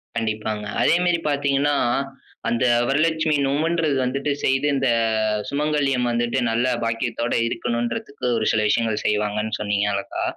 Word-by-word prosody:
கண்டிப்பாங்க. 110 -1 -2 0.2
அதே - - +4
மேரி 175 -1 +2
பார்த்தீங்கன்னா, 140 0 +1 0.7
அந்த 120 +2 +1 0.2
வரலட்சுமி 160 +2 +1
நோம்முன்றது 155 +2 +1
வந்துட்டு 135 +3 -1
செய்து, 135 +2 +2
இந்த 135 -1 +1 0.6
சுமங்கல்யம் 140 -3 0
வந்துட்டு, 120 +2 0
நல்ல 120 +3 +1 0.2
பாக்கியத்தோட 115 +1 -2
இருக்கணும்டுறதுக்கு, 120 +4 -3
ஒரு 110 - -1
சில 110 - +1
விஷயங்கள 110 0 +1
செய்வாங்கண்ணு 105 +1 0
சொன்னீங்க 105 -1 0
அழகா. 100 - -3
125 Hz, 120 wpm, -22 LUFS, 110-145 Hz, 0.7 s, அதே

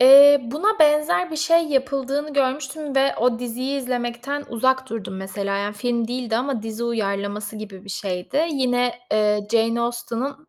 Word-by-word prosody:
Eee, 280 +2 +9
buna 320 - 0
benzer 305 +3 +3
bir 315 - -5
şey 335 +1 +3
yapıldığını 275 +1 -1
görmüştüm 280 +2 -1
ve 270 +1 +3
o 240 0 +1
diziyi 250 +3 -3
izlemekten 250 +2 -3
uzak 260 +3 0
durdum, 195 -4 -5
mesela, 195 +1 -3
yani, 205 +1 -2
film 235 0 -1
değildi 245 -2 -2
ama 250 -3 -2
dizi 225 +1 -4
uyarlaması 205 -1 -2
gibi 200 -3 -9
bir 200 - -8
şeydi. 195 - -2
Yine, 250 -4 +1 0.2
eee, 210 -1 +2
Jane 230 +1 +2
Austen'ın, 240 +5 -4
245 Hz, 155 wpm, -22 LUFS, 220-280 Hz, 0.2 s, Eee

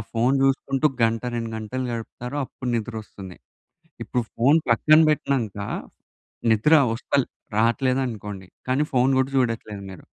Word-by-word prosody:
Phone 120 +4 +2
చూసుకుంటూ 135 +2 +2 0.2
గంట, 115 0 +2
2 115 -1 -3
గంటలు 125 +4 -4
గడుపుతారో 125 +4 -6
అప్పుడు 125 0 -7
నిద్రొస్తుంది. 105 -5 -7 0.7
ఇప్పుడు 125 - -1
ఫోన్ 140 +7 +4
పక్కన 155 +7 +5
పెట్టినంక 125 -9 -1 0.9
నిద్ర 110 +8 +2 0.2
వస్తల్ 130 +2 0 0.3
రాట్లేదనుకోండి, 115 -5 0 0.2
కానీ 130 +4 +2
ఫోన్ 130 +1 +3
కూడా 130 +1 -1
చూడట్లేదు 115 -5 -1
మీరు 95 - -12
120 Hz, 120 wpm, -24 LUFS, 110-135 Hz, 0.9 s, పక్కన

